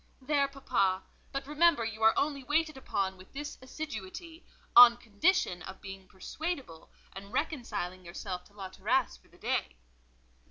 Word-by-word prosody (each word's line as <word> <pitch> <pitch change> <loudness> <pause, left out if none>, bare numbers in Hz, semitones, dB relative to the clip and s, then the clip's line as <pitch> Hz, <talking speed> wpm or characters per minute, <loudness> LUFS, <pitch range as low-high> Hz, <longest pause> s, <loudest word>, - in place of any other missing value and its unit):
"There, 280 +1 +2
papa: 195 -9 0 0.3
but 275 0 -3
remember 300 -3 +3
you 220 0 -5
are 220 0 +5
only 280 -2 0
waited 310 +3 +1
upon 195 -7 -2
with 185 0 -15
this 295 +1 -6
assiduity; 305 - -7 0.3
on 240 -1 +11
condition 230 - +1
of 190 0 -9
being 195 -1 -9
persuadable, 260 - -5 0.2
and 200 +1 -9
reconciling 245 - -3
yourself 180 +1 -6
to 205 - -21
La 195 -2 -7
Terrasse 65 - 0
for 60 - -26
the - - -21
day." - - -1
235 Hz, 150 wpm, -31 LUFS, 190-290 Hz, 0.3 s, on